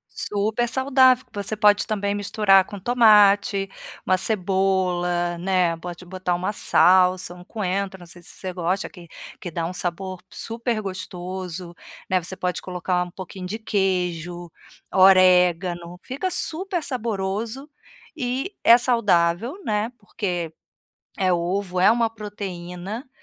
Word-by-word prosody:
Super 215 +4 -1
saudável. 260 0 +4
Você 205 0 -3
pode 210 -1 +4
também 200 -1 -1
misturar 200 -1 +3
com 205 +1 -9
tomate, 205 -4 +4 0.4
uma 185 - +3
cebola, 180 -3 0
né. 180 -2 +1
Pode 175 +1 -8
botar 180 0 -2
uma 185 +4 -2
salsa, 185 -2 +3
um 180 - -13
coentro, 195 -1 -3
não 175 - -12
sei 175 +1 -14
se - - -13
você 185 -1 -7
gosta, 180 +3 -2
que 175 -4 -14 0.3
que 175 - -6
dá 165 0 -3
um 180 - -4
sabor 185 +1 -4
super 230 -1 -3
gostoso, 185 -2 -6 0.3
né. 185 -1 +2
Você 185 +2 -7
pode 180 -1 -2
colocar 180 0 -1
um 180 - -11
pouquinho 185 0 -8
de 210 +4 -4
queijo, 180 -5 -2 0.4
orégano. 180 -2 +4
Fica 280 +9 -3
super 360 +2 -1
saboroso 230 +2 -3 0.5
e 260 +7 -3
é 230 - +9
saudável, 230 - +1
né, 215 +2 -1
porque 180 -6 -4 0.7
é 185 -2 +3
ovo, 180 +1 -1
é 195 +4 +6
uma 230 -1 +1
proteína, 200 - -7
190 Hz, 130 wpm, -23 LUFS, 180-215 Hz, 0.7 s, é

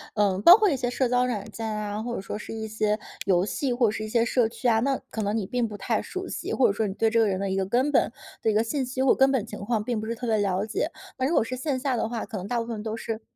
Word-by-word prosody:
呃， 200 -3 +2
包 355 - +10
括 425 -2 +3
一 295 - +1
些 250 -2 -1
社 255 0 +1
交 250 +1 +2
软 220 -5 -3
件 225 - -5
啊， 210 -1 -3
或 240 0 -3
者 - - -4
说 195 - -5
是 210 - -7
一 220 0 -4
些 215 0 0 0.3
游 185 -1 +3
戏， 260 +5 -2
或 240 -1 +3
者 - - +1
是 215 0 -4
一 215 - -5
些 230 +1 +2
社 235 -1 +2
区 245 - -3
啊， 225 -1 +4
那 270 +1 +1
可 220 - -4
能 205 +2 0
你 210 - -2
并 240 +3 -1
不 210 - -8
太 215 +3 -1
熟 375 0 -6
悉， - - -4
或 265 - +4
者 - - +1
说 215 +2 0
你 190 - -4
对 225 - +2
这 230 +1 +2
个 225 - +4
人 190 -2 -1
的 195 0 -1
一 190 - -1
个 195 0 0
根 250 +9 +1
本 275 - +3 0.3
的 220 - +1
一 - - -1
个 215 - +3
信 265 +3 -1
息 260 +1 -3
或 265 - +5
根 270 0 +4
本 250 -6 0
情 210 -3 -8
况 215 +1 -1
并 225 -1 -2
不 220 - -5
是 230 - -2
特 240 +2 -5
别 220 -1 +2
了 195 -1 0
解。 395 - -2 0.3
那 260 - 0
如 315 - 0
果 - - +4
是 255 +3 -4
线 260 +1 -2
下 265 0 0
的 225 -1 -1
话， 230 -1 -3
可 220 - -8
能 190 0 -4
大 240 +2 0
部 230 - -2
分 230 -2 -5
都 220 0 -3
是 225 -1 -4
225 Hz, 360 characters per minute, -26 LUFS, 210-250 Hz, 0.3 s, 包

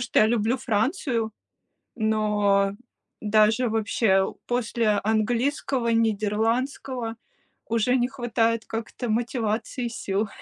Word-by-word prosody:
что 245 - 0
я 215 - +6
люблю 230 +2 +1
Францию, 230 - -1 0.6
но 210 -3 +2 0.5
даже 215 +3 +3
вообще 215 -2 +2
у 190 - -3
после 235 -2 0 0.2
английского, 235 +3 0
нидерландского 225 +3 0 0.5
уже 230 +3 +2
не 245 0 +1
хватает 230 -3 0
как-то 225 +2 -5
мотивации 230 +1 -1
и - - -1
сил. 205 -2 -2
225 Hz, 105 wpm, -25 LUFS, 215-245 Hz, 0.6 s, я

